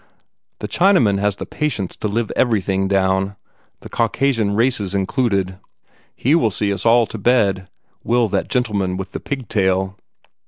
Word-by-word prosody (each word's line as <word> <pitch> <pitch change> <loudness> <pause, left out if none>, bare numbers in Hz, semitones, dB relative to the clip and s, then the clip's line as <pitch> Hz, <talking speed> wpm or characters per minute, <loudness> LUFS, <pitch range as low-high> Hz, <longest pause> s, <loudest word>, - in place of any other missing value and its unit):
The 105 - -3
Chinaman 125 - +3
has 100 -1 0
the - - -6
patience 125 -12 -3
to - - -2
live 110 +1 -2
everything 95 -5 +1
down 95 0 +1 0.5
the - - -9
Caucasian 115 -2 0
races 110 -4 0
included. 95 -2 0 0.6
He 135 - +1
will 160 -9 +3
see 100 0 -1
us 100 +3 -2
all 120 0 +5
to 110 - -8
bed, 100 -5 +2 0.4
will 120 0 +2
that - - -1
gentleman 100 -7 -1
with 95 0 -6
the - - -5
pigtail!" 95 -7 -1
105 Hz, 150 wpm, -19 LUFS, 95-120 Hz, 0.6 s, all